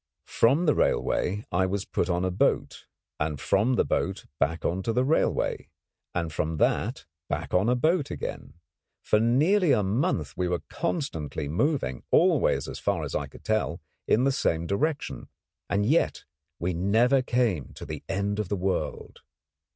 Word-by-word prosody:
From 140 +10 +3
the 150 - +4
railway 105 +4 0
I 95 +2 +2
was 95 +1 -2
put 85 - -1
on 90 +1 +1
a 95 - 0
boat, 90 - 0 0.3
and 75 -2 -2
from 110 +6 +2
the - - +2
boat - - -1
back 80 +4 0
on 90 +3 0
the 115 +5 +1
railway, 150 +5 0 0.5
and 85 -3 -2
from 80 +1 -2
that 115 - 0 0.2
back - - -3
on 95 +5 +3
a 125 - +3
boat 155 +3 +1
again. 70 - -6 0.5
For 105 - +3
nearly 150 - +3
a 105 - +2
month 95 - 0
we 90 - -1
were 90 -1 -2
constantly 135 - -3
moving, 85 - 0
always - - +3
as - - -6
far - - 0
as - - -5
I - - -1
could - - -15
tell, - - 0 0.3
in 120 - +3
the 135 - +3
same 85 -10 0
direction; 145 - -2 0.4
and 100 0 +1
yet 150 +9 +1 0.3
we 90 +2 -1
never 110 +10 +3
came 120 - 0
to - - -8
the - - -6
end 100 +2 -1
of 105 -4 -2
the 100 - 0
world. 95 +1 -3
100 Hz, 165 wpm, -27 LUFS, 90-130 Hz, 0.5 s, the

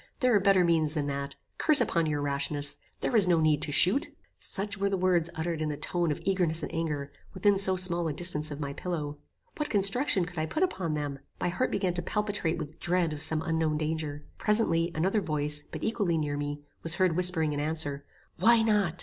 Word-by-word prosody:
there 255 -3 +3
are 205 - +5
better 195 -1 +4
means 165 -2 +1
than 150 -2 -1
that. 140 0 -4 0.2
Curse 305 -2 +6
upon 170 -9 +1
your 150 -1 -1
rashness! 145 0 -2 0.2
There 250 - -1
is 205 -5 +5
no 170 -2 +3
need 155 -2 +2
to 150 - -3
shoot." 185 - +2 0.3
Such 200 +1 -1
were 200 0 -1
the 195 - -1
words 180 -2 +2
uttered 160 0 -3
in 155 - -1
a 145 - -4
tone 170 +2 -1
of 150 - -3
eagerness 175 -4 0
and - - -5
anger, 150 -4 -3 0.2
within 195 +1 +3
so 190 -1 +4
small 175 -2 +2
a 155 - -2
distance 155 -2 +2
of 145 -1 -7
my 140 -2 -4
pillow. 150 -4 -4 0.4
What 300 -2 -2
construction 200 0 +3
could 175 -2 -7
I 155 - -1
put 315 - -1
upon 185 - -1
them? 145 -2 -4 0.2
My - - 0
heart 255 +9 -1
began 185 -3 -1
to 175 - -3
palpitate 205 -3 -2
with 155 +3 -7
dread 175 -2 0
of 145 - -4
some 160 0 0
unknown 160 -2 0
danger. 155 -1 -3
Presently, 175 -6 +2
another 190 +7 +1
voice, 150 -3 -1
but - - -7
equally 200 -7 0
near 150 -2 -2
me, 145 0 -4 0.2
was 165 0 +2
heard 185 -3 +2
whispering 175 -4 +4
in 145 - -3
answer. 145 -2 -2 0.4
"Why 230 0 +5
not? 205 -6 +1
165 Hz, 215 wpm, -28 LUFS, 150-190 Hz, 0.4 s, Curse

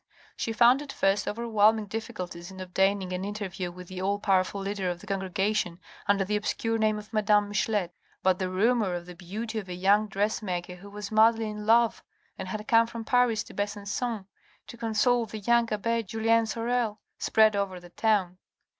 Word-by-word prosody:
She 225 - -2
found 240 +4 +5
at 290 -2 -7
first 195 -2 +1
overwhelming 220 -1 +2
difficulties 200 -5 -6
in 190 0 -11
obtaining 190 0 0
an 180 +1 -3
interview 195 -3 -4
with 180 0 -11
the 185 0 -6
all 200 +2 +1
powerful 195 -1 +1
leader 195 -1 -2
of 175 -1 -4
the - - -13
congregation 190 -1 -1 0.3
under 200 -1 +3
the 210 +2 -1
obscure 225 +2 -1
name 215 -1 +2
of 210 +1 -10
madame 210 -1 +3
Michelet. 205 -3 0 0.3
But 185 -1 +3
the 185 -1 -1
rumour 205 0 +2
of 175 0 -5
the 180 - -9
beauty 215 +6 -5
of 195 -3 -9
a 180 - -4
young 200 +4 +3
dressmaker, 195 -3 -2
who 200 +3 -12
was 205 0 -7
madly 220 0 +4
in 210 0 -7
love, 230 0 +4 0.3
and 190 - -6
had 210 +3 -5
come 230 0 +5
from 230 -1 -7
Paris 245 -4 +2
to - - -13
Besancon 205 +1 -3 0.4
to - - -10
console 230 +1 +1
the 215 - -7
young 235 +2 +2
abbe 230 +2 0
Julien 225 +2 +1
Sorel, 230 -1 -1 0.2
spread 220 -1 +4
over 195 -2 -2
the 175 0 -15
town. 190 -5 +1
210 Hz, 185 wpm, -28 LUFS, 190-225 Hz, 0.4 s, found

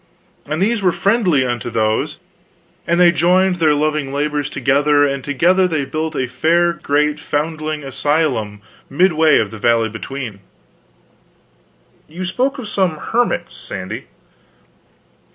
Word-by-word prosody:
And 155 +5 -1
these 225 +1 +1
were 185 -2 +3
friendly 190 - +2
unto 120 -1 -3
those, 110 -1 -1 0.7
and 170 +1 +2
they 175 -1 +6
joined 180 +2 +2
their 155 -3 +3
loving 150 -2 -1
labors 145 0 -1
together, 145 +1 +2
and 140 -2 -2
together 175 +7 +2
they 155 -5 -1
built 155 +2 -4
a 130 - 0
fair 170 +6 +1
great 150 -1 0
foundling 155 0 -3
asylum 135 -7 -1 0.3
midway 160 -1 +3
of 105 - 0
the 110 - -9
valley 115 0 +2
between." 110 -1 -7 1.7
"You 175 +4 -6
spoke 260 +10 -1
of 250 -5 -6
some 185 -6 0
hermits, 240 +9 -1
Sandy." - - -7
150 Hz, 130 wpm, -18 LUFS, 135-175 Hz, 1.7 s, they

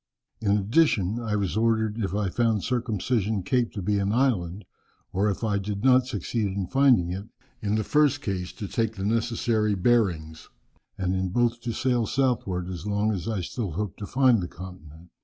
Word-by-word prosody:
"In 105 -2 +2
addition, 105 - +2
I 110 -3 -2
was 100 -4 -1
ordered, 110 -1 +1
if 100 -3 -2
I 100 -3 0
found 110 -1 +1
Circumcision 110 -4 -1
Cape 120 +4 +1
to 100 - -5
be 105 +2 +1
an 100 +1 0
island, 105 -7 0 0.5
or 100 +3 +2
if 100 - -3
I 105 -2 +1
did 100 +1 -4
not 130 -1 +5
succeed 110 -1 -2
in 95 0 -2
finding 125 -9 +3
it, 95 +3 -5 0.4
in 105 0 0
the 110 - +1
first 145 +4 +3
case 95 -8 -3
to 100 - -6
take 110 +2 -1
the 95 -1 -4
necessary 115 -1 +1
bearings, 90 -7 0 0.5
and 95 -2 -1
in 95 0 -1
both 120 +3 +1
to 120 0 -3
sail 120 -1 0
southward 110 -9 0
as 90 +1 -6
long 105 +1 +1
as 95 -1 -4
I 110 -4 -1
still 95 0 -4
hoped 100 +2 -4
to 100 - -5
find 130 -5 +4
the 90 - -3
continent. 85 -2 -11
105 Hz, 190 wpm, -26 LUFS, 95-120 Hz, 0.5 s, not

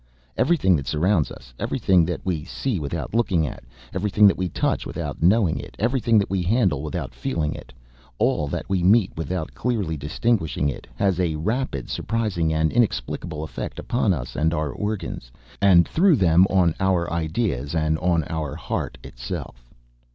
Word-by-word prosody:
Everything 130 - +3
that 70 -4 -3
surrounds 80 +4 +2
us, - - -12
everything 90 -3 +2
that 90 0 -4
we 85 -5 -1
see 100 - -3
without 70 +5 -4
looking 95 -8 +2
at 65 - -6
it, - - -24 0.3
everything 105 +3 +3
that 100 - +6
we 90 -1 -2
touch - - 0
without - - -5
knowing 95 -1 +3
it, - - -9
everything 115 -1 +2
that 100 - +2
we 95 -1 -1
handle 95 - +2
without 75 -4 -4
feeling 75 +5 -2
it, 60 - -11 0.5
all 75 - +1
that - - -4
we 95 -2 0
meet 95 +2 +4
without 80 0 -3
clearly 105 -10 -1
distinguishing 75 +1 0
it, 70 - -7
has 95 +6 +1
a 85 -4 +1
rapid, 105 - -2
surprising 105 -8 -1
and 80 0 +1
inexplicable 80 - -1
effect 70 -6 -6
upon 120 -4 0
us 65 -8 -3
and 80 +2 +1
upon 80 -1 0
our 75 - -3
organs, 105 - -4 0.3
and 90 -4 +6
through 180 0 +4
them 90 -3 +5
on 90 -4 +3
our 95 -3 +1
ideas 80 - -1
and 80 0 +1
on 85 -2 +2
our 80 -4 -3
heart - - -4
itself. - - -7
85 Hz, 175 wpm, -23 LUFS, 75-105 Hz, 0.5 s, that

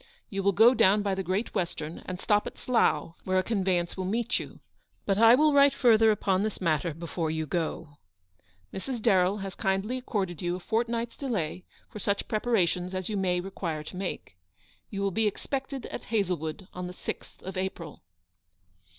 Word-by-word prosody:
You 195 -1 -1
will 200 +1 +3
go 225 +6 +7
down 205 -3 +4
by 200 -1 0
the 190 - -1
Great 190 +5 -2
Western, 165 -2 -3
and 180 -1 -4
stop 210 +1 +2
at - - -8
Slough, 230 -8 +1
where 185 0 +1
a 185 - +3
convey 190 -5 +1
ance 175 0 -3
will 190 - -3
meet 225 +5 0
you; - - -9 0.5
but 195 0 +1
I 230 +1 +8
will 300 +2 +4
write 280 0 +6
farther 225 -3 +5
upon 195 -3 +2
this 215 0 -2
matter 160 -2 0
before 165 0 -3
you 160 0 -2
go. 155 -2 -3 0.8
Mrs. 245 +5 -4
Darrell 195 -3 +3
has 195 - -5
kindly 195 +7 -1
accorded 195 - -3
you 175 0 -1
a - - -5
fortnight's 230 +4 -1
delay 185 - -3 0.2
for 210 - -9
such 200 +1 -1
preparations 190 -5 0
as 185 +1 -3
you 215 - -2
may 185 -2 +1
require 175 -4 -4
to 170 - -9
make. 180 - -5 0.5
You 200 -1 -3
will 200 - +1
be 220 +4 +1
expected 270 +4 -4
at - - -7
Hazlewood 180 -5 -2
on 180 0 -5
the 180 - -7
6th - - -7
of 190 +1 -6
April. 185 -4 -4
195 Hz, 185 wpm, -28 LUFS, 180-220 Hz, 0.8 s, I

